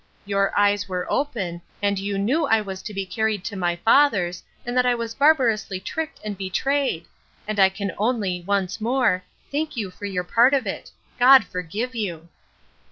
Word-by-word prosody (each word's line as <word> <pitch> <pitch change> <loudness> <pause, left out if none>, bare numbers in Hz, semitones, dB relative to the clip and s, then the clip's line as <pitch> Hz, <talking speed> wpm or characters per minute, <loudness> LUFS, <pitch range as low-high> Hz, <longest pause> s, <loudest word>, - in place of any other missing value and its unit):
—Your 195 0 +1
eyes 205 0 +2
were 180 -1 -2
open, 200 -12 -2 0.2
and 200 -1 0
you 200 0 -2
knew 270 +11 +1
I 225 -3 +4
was 190 -3 -6
to 215 - -7
be 195 -1 -3
carried 215 0 -1
to 205 - -5
my 175 -2 0
father's, 200 -4 +3 0.2
and 245 +1 -3
that 250 - +4
I 250 -1 +2
was 230 -1 -4
barbarously 230 -9 +2
tricked 320 +11 -5
and 210 -1 -3
betrayed; 195 - -1 0.4
and 215 -1 -2
I 190 -1 +7
can 200 0 -4
only, 205 -6 0
once 195 +2 -1
more, 240 -5 +2 0.3
thank 300 -1 -2
you 200 -5 -3
for 205 - -9
your 185 -3 -2
part 240 +9 +4
of 270 - 0
it. - - -5 0.3
God 260 -2 +8
forgive 190 +9 -4
you! 175 -8 -4
205 Hz, 180 wpm, -23 LUFS, 190-245 Hz, 0.4 s, God